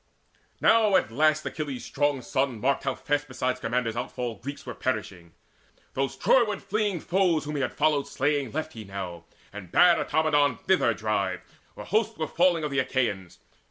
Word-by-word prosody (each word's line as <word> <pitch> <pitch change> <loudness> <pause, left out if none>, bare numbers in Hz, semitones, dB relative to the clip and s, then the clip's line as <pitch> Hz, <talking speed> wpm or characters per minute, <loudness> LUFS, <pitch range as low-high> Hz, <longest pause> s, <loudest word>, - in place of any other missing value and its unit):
Now 220 -3 +4
at 150 - +3
the - - -14
last 155 +3 +2
Achilles' 145 -5 -4
strong 145 -2 0
son 130 -3 -1
marked 135 +5 0
How 135 - 0
fast 145 0 -1
beside 130 -1 -2
Scamander's 125 -2 -2
outfall 120 0 -3
Greeks 140 +6 -7
Were 125 - -5
perishing. 100 -10 -4 0.6
Those 135 -2 -1
Troyward 215 -6 +3
fleeing 205 -3 -1
foes 175 -3 +1
Whom 150 +1 -4
he 140 - -1
had - - -2
followed 150 -2 +2
slaying, 145 -2 -1
left 155 +1 -4
he 110 - -8
now, 95 -4 -7 0.3
And 100 -4 -9
bade 175 -1 +6
Automedon 145 -4 +2
thither 150 - +2
drive, 100 -3 -1 0.3
where - - -8
hosts 220 +1 0
Were 160 - -1
falling 175 -2 +2
of 150 - -2
the 140 - +1
Achaeans. 115 -9 -1
140 Hz, 175 wpm, -26 LUFS, 115-155 Hz, 0.6 s, bade